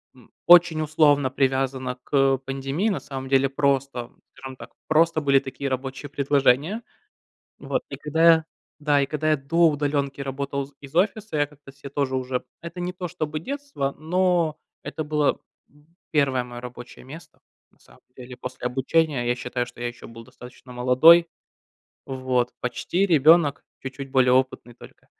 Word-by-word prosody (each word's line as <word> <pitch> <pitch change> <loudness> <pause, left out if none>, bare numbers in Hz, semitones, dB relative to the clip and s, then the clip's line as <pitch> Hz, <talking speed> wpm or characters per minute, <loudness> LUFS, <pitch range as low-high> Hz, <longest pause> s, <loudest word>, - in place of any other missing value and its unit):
м, 125 -3 -20
очень 175 -2 +6
условно 145 -3 +3
привязано 130 -1 -1
к 135 -1 +2
пандемии. 135 +8 -2
На 195 - -1
самом 135 -1 -7
деле, 135 0 +3
просто, 135 -3 -1 0.2
скажем 130 -1 -9
так, - - -12 0.2
просто 160 +1 +3
были 140 -2 +4
такие 135 +1 -5
рабочие 135 +2 -5
предложения. 140 - +1 0.8
Вот, - - -3
и - - -5
когда 150 +2 -2
я 165 -1 +6 0.3
Да, 145 -2 +2
и 140 - +1
когда 155 +2 -1
я 155 - +4
до 165 +5 +3
удаленки 140 -1 -2
работал 140 0 -3
з 140 - -21
из 140 0 -12
офиса, 200 0 0
я 145 - +2
как-то 145 -1 -17
себе 140 0 -11
тоже 140 -1 -2
уже 130 -1 -3 0.2
Это 170 +2 -9
не 180 +1 -3
то, 180 -1 -6
чтобы 155 -3 -4
детство, 280 - -4
но 175 -1 +1 0.2
это 155 - -5
было, 150 -1 0 0.3
м, 150 +1 -25 0.2
1 135 -6 +1
мое 120 -1 -9
рабочее 125 0 -10
место, 155 +6 -13 0.3
на - - -32
самом - - -22 0.2
деле, 125 0 -10
после 125 -1 -6
обучения. 135 +1 0
Я 120 - +2
считаю, 125 0 -3
что 120 0 -14
я 120 - -2
еще 120 - -11
был 115 0 -12
достаточно 125 +2 -14
молодой. 130 +8 +6 0.8
Вот. 130 -2 -1
Почти 170 +10 -1
ребенок, 155 -2 +4 0.2
чуть-чуть 135 0 -7
более 130 -1 +3
опытный 130 -2 0
только, - - -16
140 Hz, 165 wpm, -24 LUFS, 130-155 Hz, 0.8 s, очень